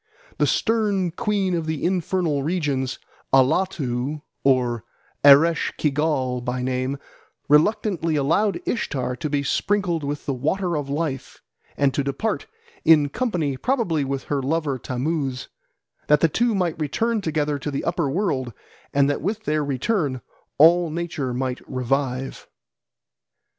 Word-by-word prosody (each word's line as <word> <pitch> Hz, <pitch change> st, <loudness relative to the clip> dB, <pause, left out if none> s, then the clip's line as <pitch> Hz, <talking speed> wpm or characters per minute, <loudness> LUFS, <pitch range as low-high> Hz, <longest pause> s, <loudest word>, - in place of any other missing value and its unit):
The -, -, +3 dB
stern 210 Hz, -6 st, +1 dB
queen 200 Hz, 0 st, 0 dB
of 165 Hz, -2 st, -1 dB
the 160 Hz, -2 st, -3 dB
infernal 175 Hz, -4 st, 0 dB
regions, 140 Hz, -5 st, -1 dB, 0.3 s
Allatu 135 Hz, -1 st, +1 dB, 0.2 s
or 125 Hz, -4 st, +2 dB, 0.4 s
Eresh 145 Hz, +4 st, +6 dB
Kigal 140 Hz, -4 st, 0 dB
by 125 Hz, 0 st, -2 dB
name, 130 Hz, +2 st, -1 dB, 0.5 s
reluctantly 165 Hz, +1 st, +2 dB
allowed 165 Hz, +9 st, +1 dB
Ishtar 130 Hz, -, -2 dB
to 155 Hz, -, -3 dB
be 145 Hz, -1 st, 0 dB
sprinkled 175 Hz, +2 st, 0 dB
with 145 Hz, +1 st, -4 dB
the 140 Hz, -, -1 dB
Water 170 Hz, +7 st, -1 dB
of 145 Hz, -2 st, -3 dB
Life 145 Hz, -2 st, -3 dB, 0.3 s
and 140 Hz, -2 st, +2 dB
to 140 Hz, -, 0 dB
depart, 170 Hz, +11 st, -2 dB, 0.4 s
in 150 Hz, -3 st, +5 dB
company 165 Hz, -, -1 dB
probably 225 Hz, -, 0 dB
with 135 Hz, 0 st, -3 dB
her 145 Hz, -2 st, -1 dB
lover 145 Hz, -1 st, -1 dB
Tammuz, 130 Hz, +1 st, -2 dB, 0.6 s
that 150 Hz, 0 st, +4 dB
the 165 Hz, -, +5 dB
two 235 Hz, +6 st, +1 dB
might 175 Hz, -4 st, -1 dB
return 220 Hz, -, 0 dB
together 150 Hz, -4 st, -1 dB
to 145 Hz, -, -4 dB
the 140 Hz, -, -3 dB
upper 170 Hz, -4 st, 0 dB
world, 135 Hz, -, -1 dB, 0.4 s
and 140 Hz, 0 st, +3 dB
that 145 Hz, -, -1 dB
with 210 Hz, +7 st, -2 dB
their 155 Hz, -3 st, 0 dB
return 140 Hz, -, -1 dB, 0.4 s
all 170 Hz, +3 st, +6 dB
nature 160 Hz, -5 st, -3 dB
might 125 Hz, 0 st, -2 dB
revive. 130 Hz, +1 st, -2 dB
150 Hz, 135 wpm, -23 LUFS, 135-175 Hz, 0.6 s, Eresh